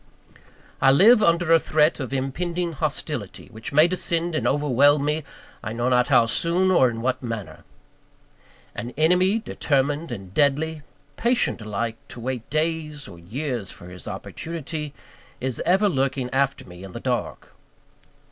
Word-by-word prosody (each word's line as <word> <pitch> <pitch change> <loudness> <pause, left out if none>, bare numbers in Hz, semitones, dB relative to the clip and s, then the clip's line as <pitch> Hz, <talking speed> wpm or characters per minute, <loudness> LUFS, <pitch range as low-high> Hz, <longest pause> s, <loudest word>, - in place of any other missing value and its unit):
I 135 - +6
live 215 - +6
under 170 -3 +3
a 165 - +7
threat 155 +1 +2
of 130 -3 -4
impending 170 +6 -2
hostility, 145 - -4
which 110 0 -7
may 155 +3 +6
descend 170 -1 0
and 155 - 0
overwhelm 145 0 +3
me, 150 +1 0 0.4
I 110 - -5
know 120 +2 0
not 125 -1 +3
how 120 -4 +5
soon, 170 +10 +1
or 130 -8 +5
in 115 -1 -6
what 130 0 0
manner. 115 -7 -6 1.1
An 120 +1 -6
enemy, 180 +6 +3
determined 145 - -1
and 95 -5 -7
deadly, 150 +3 +1 0.4
patient 235 - +1
alike 110 +2 -3
to - - -10
wait 125 -1 -4
days 155 -1 -2
or 85 - -12
years 120 - -4
for 90 - -11
his 90 -3 -8
opportunity, 155 -2 -6 0.4
is 130 -2 -2
ever 190 +4 +4
lurking 135 -5 -1
after 135 +1 0
me 90 +1 -12
in 95 -2 -10
the - - -6
dark. - - -3
145 Hz, 150 wpm, -24 LUFS, 120-165 Hz, 1.1 s, a